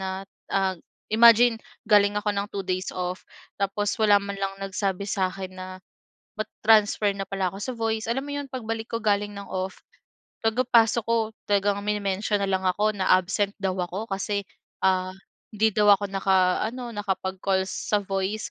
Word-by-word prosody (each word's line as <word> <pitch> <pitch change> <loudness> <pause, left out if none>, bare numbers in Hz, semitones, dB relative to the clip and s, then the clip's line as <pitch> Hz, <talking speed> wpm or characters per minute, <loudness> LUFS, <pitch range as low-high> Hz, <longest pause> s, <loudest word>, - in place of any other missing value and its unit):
na 190 0 -3 0.4
ag 190 -1 0 0.4
imagine, 235 +1 +7 0.3
galing 205 -1 +5
ako 210 0 -1
ng 200 0 -2
2 200 - -3
days 185 0 -2
off, 180 0 -4 0.4
tapos 200 +1 0
wala 210 -2 +6
man 200 0 -5
lang 195 0 -1
nagsabi 195 0 -2
sa 190 -2 +1
akin 190 0 -7
na 185 - -6 0.7
mata-transfer 215 -1 +2
na 195 - -3
pala 195 -1 -1
ako - - -7
sa 255 +4 -3
voice. 225 -1 -1
Alam 270 +4 -1
mo 290 - -6
'yon, 285 -1 -5
pagbalik 225 -3 -4
ko 230 - 0
galing 205 -1 +1
ng 200 0 -8
off, 185 0 -4 0.7
pagkapasok 230 -1 +3
ko 230 0 +2 0.3
talagang 200 0 +2
mini-mention 205 0 0
na 195 - 0
lang 190 0 0
ako 205 +4 +2
na 190 -2 -2
absent 195 +2 0
daw 190 - +1
ako 185 +5 -4
kasi, 200 +1 -1 0.4
ah, 185 0 +1 0.4
hindi 220 0 +2
daw 210 -1 +5
ako 205 - -3
nakaano, 195 +6 +1
nakapag-calls 190 -1 -1 0.2
sa 210 - +4
voice, 195 +2 -3
200 Hz, 165 wpm, -25 LUFS, 190-220 Hz, 0.7 s, imagine